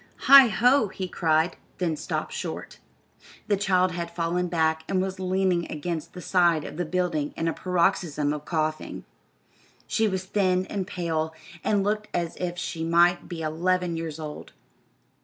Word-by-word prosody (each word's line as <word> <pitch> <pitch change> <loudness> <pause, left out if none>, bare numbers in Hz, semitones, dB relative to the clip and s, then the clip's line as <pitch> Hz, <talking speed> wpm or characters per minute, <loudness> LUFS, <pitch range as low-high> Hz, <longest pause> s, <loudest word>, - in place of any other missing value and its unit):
"Heigh 275 -2 +9
ho!" 245 +3 +3
he 190 -1 -5
cried, 160 -1 +1 0.2
then 170 -4 0
stopped - - -4
short. - - -6 0.7
The 205 - +3
child 185 -2 +2
had 170 -1 -4
fallen 175 +1 -1
back 160 -2 +1
and 190 - +1
was 190 0 -2
leaning 185 -2 0
against 160 +1 -4
the 180 - -8
side 170 -4 +3
of - - -8
the 175 - -1
building 160 -3 -1
in 165 - -1
a 165 - +1
paroxysm 170 -5 0
of 150 -1 -5
coughing. 155 -1 -3 0.8
She 220 -1 +1
was 190 -2 -2
thin 185 -2 +1
and 195 -3 -2
pale, 160 -2 -2 0.3
and 205 -2 +2
looked 210 +1 -1
as 170 -1 -2
if 175 -1 -3
she 165 -1 -4
might 170 +1 +3
be 165 -3 -5
eleven 175 +2 0
years 165 -1 -5
old. 150 -1 -8
175 Hz, 160 wpm, -26 LUFS, 160-185 Hz, 0.8 s, Heigh